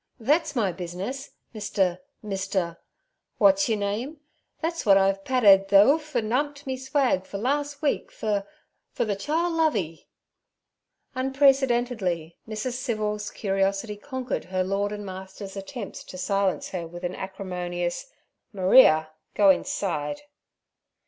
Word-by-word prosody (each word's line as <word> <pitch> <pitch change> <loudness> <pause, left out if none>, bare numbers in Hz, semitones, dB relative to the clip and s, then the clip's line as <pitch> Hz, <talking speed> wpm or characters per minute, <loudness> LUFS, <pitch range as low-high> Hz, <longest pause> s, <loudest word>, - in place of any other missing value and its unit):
'Thet's 295 +5 +1
my 210 -6 +1
business, 185 +10 -5 0.2
Mr.—Mr.—Wat's 205 - -1
yur 220 - +2
name. 215 +9 -3 0.4
Thet's 335 +1 -2
w'at 195 -2 +6
I've 195 0 +2
padded 200 -7 +5
ther 200 +1 +8
'oof 300 0 +1
an' 225 -2 0
'umped 285 +2 -1
me 265 -1 -2
swag 265 -6 +1
fer 200 - -5
the 200 - -6
lars' 285 +2 -1
week 290 - 0
fer—fer 215 +9 -4
the 205 -2 -1
chile 320 - 0
Lovey.' 225 - 0 1.1
Unprecedentedly 245 - +1
Mrs. 220 +3 -3
Civil's 210 -4 -2
curiosity 195 +1 -1
conquered 260 +3 -4
her 185 0 -1
lord 200 +2 -1
and 205 -1 -6
master's 190 +1 -8
attempts 200 +2 -7
to 185 - -9
silence 195 0 0
her 175 -3 -4
with 175 +2 -10
an 175 - -2
acrimonious, 180 - -4 0.4
'Maria, 185 -6 +5 0.2
go 200 -2 +7
inside.' 165 - -2
210 Hz, 120 wpm, -26 LUFS, 190-265 Hz, 1.1 s, ther